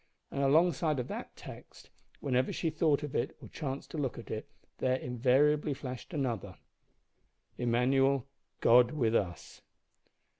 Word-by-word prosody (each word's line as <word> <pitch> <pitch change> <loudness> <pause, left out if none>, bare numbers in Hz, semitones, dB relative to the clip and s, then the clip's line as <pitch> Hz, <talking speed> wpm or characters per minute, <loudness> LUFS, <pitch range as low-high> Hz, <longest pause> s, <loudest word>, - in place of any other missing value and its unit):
And 140 - -2
alongside 155 +1 +3
of 125 - -3
that - - -6
text, - - -12 0.3
whenever 130 -1 +1
she 165 - -1
thought 155 -2 +2
of 145 - -5
it - - -1
or - - -11
chanced 140 -3 -5
to 160 - -4
look 135 -4 -2
at 115 - -9
it, 110 +5 -4 0.3
there 130 0 +2
invariably 135 +4 +2
flashed 130 -2 -7
another: 130 - -3 1.0
"Immanuel, 130 +2 +2 0.4
God 120 +1 +6
with 120 -7 +1
us." 85 -5 -2
135 Hz, 140 wpm, -31 LUFS, 125-150 Hz, 1.0 s, God